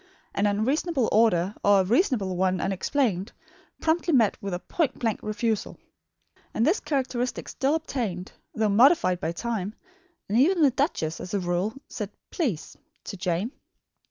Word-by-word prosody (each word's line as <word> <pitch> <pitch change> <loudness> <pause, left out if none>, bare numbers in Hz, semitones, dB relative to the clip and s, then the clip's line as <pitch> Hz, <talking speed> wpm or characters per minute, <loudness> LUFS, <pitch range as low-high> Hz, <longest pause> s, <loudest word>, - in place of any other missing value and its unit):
An 205 - +1
unreasonable 255 - +1
order, 205 -4 +3
or 200 -1 +5
a - - +1
reasonable 215 - +1
one 185 0 +1
unexplained, 195 +1 0 0.5
promptly 335 +2 +1
met 225 -5 +4
with 200 - -4
a 175 - -1
point 295 - -1
blank 225 -3 -1
refusal. 215 0 -2 0.8
And 225 - +2
this 340 +9 +3
characteristic 260 -4 -2
still 275 +3 +1
obtained, 235 - -3 0.2
though 220 -1 +1
modified 235 - +4
by 160 - -2
time; 215 +1 -3 0.5
and 215 +4 +2
even 335 +4 +4
the 280 - +6
duchess, 240 - -1
as 180 +3 -5
a - - +1
rule, 180 +4 -1
said 210 -3 -5 0.2
"please" 235 - -2 0.3
to - - -6
Jane. 180 +5 -1
220 Hz, 150 wpm, -26 LUFS, 190-270 Hz, 0.8 s, the